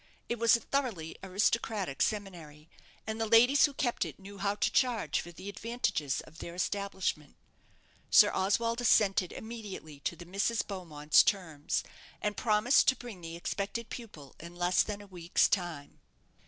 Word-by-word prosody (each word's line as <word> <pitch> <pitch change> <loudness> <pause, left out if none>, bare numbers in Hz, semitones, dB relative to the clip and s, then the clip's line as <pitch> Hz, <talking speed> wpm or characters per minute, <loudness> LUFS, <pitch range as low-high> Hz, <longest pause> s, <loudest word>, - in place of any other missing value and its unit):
It 235 - -3
was 230 0 +6
a - - -12
thoroughly 225 - -2
aristocratic 195 -3 0
seminary, 170 -8 -3 0.4
and 220 +1 -4
the 225 - 0
ladies 245 +5 +6
who 290 - -3
kept 245 -4 0
it - - -7
knew 200 0 -12
how 200 +1 0
to - - 0
charge 245 -4 +1
for 175 - -10
the 185 +3 -11
advantages 200 - -2
of 160 +1 -16
their 170 - -7
establishment. 190 -6 -2 0.7
Sir - - +7
Oswald 230 +5 +1
assented 195 -6 +3
immediately 210 -10 -8
to 170 - -3
the 175 +1 -11
Misses 200 +5 0
Beaumonts' 155 -6 +2
terms, 165 -8 -1 0.4
and 210 0 -2
promised 220 +3 +3
to 260 - +5
bring 235 -8 -10
the 165 0 -7
expected 200 +6 -4
pupil 165 - -9
in 170 +1 -10
less 180 +1 +3
than 205 -1 -3
a - - -12
week's 175 -3 +1
time. 175 -7 -3
200 Hz, 160 wpm, -31 LUFS, 170-225 Hz, 0.7 s, Sir